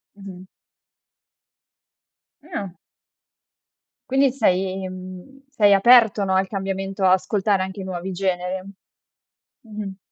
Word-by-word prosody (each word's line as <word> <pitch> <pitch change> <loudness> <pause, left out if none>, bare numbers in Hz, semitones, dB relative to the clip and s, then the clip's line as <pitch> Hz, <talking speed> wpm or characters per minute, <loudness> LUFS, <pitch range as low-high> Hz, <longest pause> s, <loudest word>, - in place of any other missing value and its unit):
Mh-mh. 190 -2 -11 2.0
Ah. 280 - -6 1.4
Quindi 270 0 +3
sei 190 -6 0
mhmm, 185 +9 -11
sei 210 -7 +4
aperto 220 0 +5
no 190 0 0
al 190 0 +1
cambiamento, 195 0 -3
ascoltare 190 +1 +2
anche 190 +1 -7
i - - -6
nuovi 185 0 -5
generi? 185 0 -2 1.0
Mh-mh. 210 -4 -8
195 Hz, 95 wpm, -22 LUFS, 185-210 Hz, 2.0 s, aperto